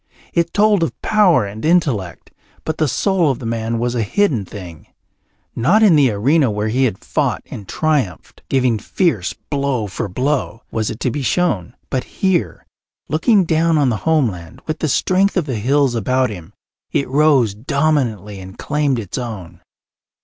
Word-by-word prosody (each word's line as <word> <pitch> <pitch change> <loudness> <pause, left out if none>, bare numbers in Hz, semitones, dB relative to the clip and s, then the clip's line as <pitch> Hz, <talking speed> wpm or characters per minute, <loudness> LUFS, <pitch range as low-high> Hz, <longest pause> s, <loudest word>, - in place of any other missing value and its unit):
It 170 -1 +1
told 205 -2 +3
of 165 - -2
power 185 - +4
and 100 +2 -8
intellect, 140 - 0 0.3
but 160 - -3
the 155 - +2
soul 180 - +1
of 135 - 0
the 120 - -8
man 115 0 -2
was 120 +1 -1
a 120 - 0
hidden 125 - +1
thing. 90 -5 -10 0.7
Not 180 - +3
in 195 -7 +6
the 140 -4 +5
arena 130 +7 +2
where 105 +1 -2
he 130 +4 +2
had 110 -6 -1
fought - - -1
and 100 - -8
triumphed, 145 - -2
giving 125 -4 +2
fierce 115 - 0 0.2
blow 140 -5 0
for 100 0 -4
blow, 125 +1 -2
was 110 -2 -1
it 110 - -6
to 125 - 0
be 145 - -3
shown; 125 - 0 0.2
but 130 - 0
here, 190 -3 -1 0.4
looking 190 - +3
down 165 0 +2
on 140 -3 +3
the 110 - 0
homeland, 110 - -1
with 155 0 -3
the 155 - 0
strength 190 +8 +2
of 175 - +1
the 130 -6 -3
hills 135 +3 +2
about 125 +2 +1
him, 90 -1 -10 0.4
it 140 - 0
rose 135 -5 +3
dominantly 115 - -1
and 95 0 -11
claimed 145 -3 0
its 115 +3 -4
own. 95 -8 -7
130 Hz, 170 wpm, -18 LUFS, 110-155 Hz, 0.7 s, in